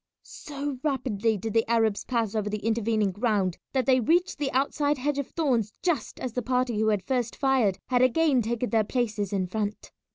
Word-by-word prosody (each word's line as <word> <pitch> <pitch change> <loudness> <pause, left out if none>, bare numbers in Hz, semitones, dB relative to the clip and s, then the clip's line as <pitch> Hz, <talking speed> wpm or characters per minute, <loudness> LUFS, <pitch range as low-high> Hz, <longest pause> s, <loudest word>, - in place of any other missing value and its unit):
So 285 -2 -6
rapidly 230 -7 0
did 215 +2 -4
the 225 0 +2
Arabs 225 -3 +1
pass 230 -5 -1
over 210 -2 -1
the 210 0 -4
intervening 220 -2 +1
ground 205 -4 0
that 260 -3 0
they 260 0 +4
reached 340 - +1
the 285 -2 -1
outside 285 +2 +1
hedge 285 +2 -1
of 280 - -3
thorns 245 -10 0
just 325 -10 -1
as 250 -3 -4
the 250 - -1
party 250 -2 0
who 220 - +2
had 210 -3 +1
first 245 -3 -1
fired 260 -9 +2
had 250 -1 +1
again 260 +1 +3
taken 235 +2 -2
their 225 -2 +3
places 215 -3 -2
in 195 -2 0
front. 210 +2 -4
235 Hz, 195 wpm, -27 LUFS, 215-265 Hz, -, they